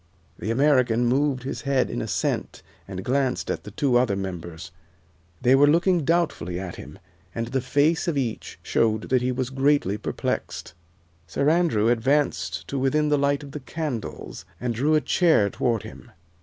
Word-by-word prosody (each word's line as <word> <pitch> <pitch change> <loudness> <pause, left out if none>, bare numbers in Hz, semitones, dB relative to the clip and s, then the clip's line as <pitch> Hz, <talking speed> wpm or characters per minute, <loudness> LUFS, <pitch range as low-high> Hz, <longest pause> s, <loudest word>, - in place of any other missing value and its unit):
The 100 - -4
American 125 -2 +3
moved 130 +1 +1
his 135 - -4
head 135 -3 +1
in - - -3
assent - - -2 0.2
and 95 -1 -6
glanced 130 -1 0
at - - -5
the - - -7
two 125 +4 +1
other 120 -5 +2
members. 85 -3 -6 0.7
They 125 - +5
were 140 +2 +6
looking 170 +1 +3
doubtfully 150 - 0
at 95 -2 -6
him, - - -10 0.4
and 115 0 -3
the 130 +1 -1
face 145 +7 +1
of 165 -4 0
each 120 -5 -3
showed 110 -1 0
that 130 -1 +3
he 125 +1 0
was 130 0 -3
greatly 135 -7 +1
perplexed. 105 - -4 0.5
Sir 140 - +1
Andrew 160 -11 +2
advanced 115 - 0
to 140 - -2
within 150 +3 +1
the 145 -1 +2
light 140 +1 +1
of 140 - -10
the 150 - -6
candles 135 - -5 0.2
and 120 -1 -2
drew 145 +7 +2
a 155 - +3
chair 155 - +3
toward 115 -3 -1
him. 110 +2 -11
130 Hz, 170 wpm, -24 LUFS, 110-145 Hz, 0.7 s, were